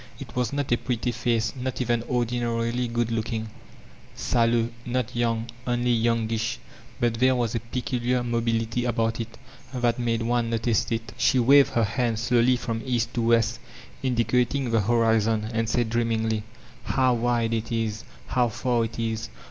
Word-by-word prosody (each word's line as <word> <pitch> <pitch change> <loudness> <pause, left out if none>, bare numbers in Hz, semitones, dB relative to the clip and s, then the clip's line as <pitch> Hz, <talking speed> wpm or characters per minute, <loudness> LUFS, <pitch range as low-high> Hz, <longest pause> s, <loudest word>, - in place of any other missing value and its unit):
It - - -9
was 125 -2 0
not 140 -2 -2
a 120 - +4
pretty 125 -1 -1
face, 115 0 0
not 130 0 -4
even 120 -2 +1
ordinarily 120 0 0
good 120 0 -1
looking, 110 -1 -2 0.3
— - - -23
sallow, 115 -1 +2
not 125 -1 -2
young, 115 -1 0 0.2
only 120 0 +1
youngish; 115 -1 0 0.4
but 120 -1 +2
there 130 +1 +4
was 120 -3 0
a 115 - 0
peadiar 125 +1 -1
mobility 115 0 0
about 115 -1 0
it, 115 0 -6 0.3
that 120 -2 0
made 115 -1 0
one 120 0 +1
notice 115 0 0
it. 115 0 -3
She 135 - +3
waved 135 +3 +6
her 115 - +3
hand 115 +1 0
slowly 120 +2 +3
from 115 -2 -3
East 120 -2 -1
to 120 - -1
West, 115 -1 +2 0.4
indicating 125 +1 +1
the 115 -1 +3
horizon, 110 0 +2
and 115 0 0
said 115 -1 0
dreamingly: 115 -2 0 0.5
''How 130 -2 +3
wide 115 -1 +1
it 115 0 -2
is, 110 -2 -2 0.2
how 120 - +1
far 120 +1 0
it 115 - -7
is! 110 -4 -2
115 Hz, 165 wpm, -25 LUFS, 115-120 Hz, 0.5 s, waved